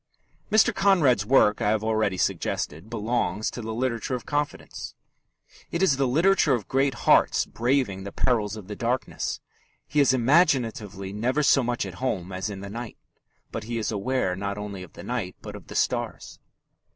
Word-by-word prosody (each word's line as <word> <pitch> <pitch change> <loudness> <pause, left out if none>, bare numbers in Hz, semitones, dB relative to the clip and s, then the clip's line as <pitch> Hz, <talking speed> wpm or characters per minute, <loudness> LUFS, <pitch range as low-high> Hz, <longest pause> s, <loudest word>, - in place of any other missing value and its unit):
Mr. 215 0 +5
Conrad's 150 - +3
work, 110 -5 +4
I 105 - +2
have 110 0 +1
already 110 -3 +1
suggested, 80 +1 -2
belongs 110 -1 -1
to 120 - -6
the 110 0 -5
literature 120 +1 -1
of 125 - -7
confidence. 145 0 -4 0.7
It 170 +2 -1
is 155 -8 +4
the 135 -1 +2
literature 160 +1 +3
of 110 -5 -6
great 135 0 +1
hearts - - +4
braving 120 -6 0
the 100 - -6
perils 110 -5 0
of 105 -4 -10
the 105 - -6
darkness. 120 +4 -2 0.5
He 150 - 0
is 140 -3 +5
imaginatively 115 - +1
never 125 +8 0
so 135 -1 +5
much 120 0 -1
at - - -7
home 95 -8 -2
as 95 +2 -3
in 100 -2 -6
the 100 - -7
night, 120 +1 -7 0.5
but 110 - -5
he 120 +1 -3
is 110 -1 -1
aware 105 -2 0
not 100 +1 -3
only 105 -2 -6
of 90 - -11
the - - -10
night, 115 -7 -3
but - - -8
of - - -11
the - - -9
stars. - - -2
115 Hz, 180 wpm, -26 LUFS, 105-130 Hz, 0.7 s, Mr